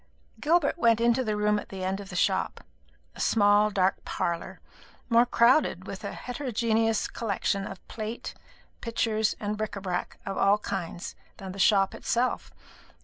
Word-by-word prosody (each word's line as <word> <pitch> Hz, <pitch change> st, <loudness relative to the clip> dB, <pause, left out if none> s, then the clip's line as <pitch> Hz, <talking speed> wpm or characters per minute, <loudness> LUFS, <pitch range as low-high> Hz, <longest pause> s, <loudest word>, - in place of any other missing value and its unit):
Gilbert 325 Hz, 0 st, +2 dB
went 230 Hz, -4 st, +4 dB
into 235 Hz, +2 st, +3 dB
the 215 Hz, -3 st, -1 dB
room 210 Hz, 0 st, +2 dB
at -, -, -10 dB
the 190 Hz, -1 st, -6 dB
end 190 Hz, +1 st, -1 dB
of 200 Hz, -2 st, -9 dB
the 180 Hz, -, -7 dB
shop -, -, 0 dB, 0.5 s
a -, -, -14 dB
small 205 Hz, -1 st, +4 dB
dark 190 Hz, -2 st, +1 dB
parlour, 170 Hz, -1 st, -3 dB, 0.5 s
more 235 Hz, +1 st, +5 dB
crowded 235 Hz, -, +3 dB
with 195 Hz, +1 st, -7 dB
a 200 Hz, -, -4 dB
heterogeneous 225 Hz, -4 st, 0 dB
collection 200 Hz, -2 st, -2 dB
of 195 Hz, -, -10 dB
plate, 220 Hz, +1 st, -5 dB, 0.5 s
pictures, 220 Hz, -2 st, 0 dB
and 210 Hz, 0 st, -3 dB
bric 215 Hz, -1 st, -3 dB
a -, -, -4 dB
brac 180 Hz, -2 st, -3 dB
of 195 Hz, -, -3 dB
all 200 Hz, +1 st, +5 dB
kinds 180 Hz, -4 st, -5 dB, 0.2 s
than 190 Hz, -1 st, -7 dB
the 195 Hz, -, -9 dB
shop 195 Hz, -1 st, +4 dB
itself. 245 Hz, +2 st, -1 dB
210 Hz, 160 wpm, -27 LUFS, 195-230 Hz, 0.5 s, more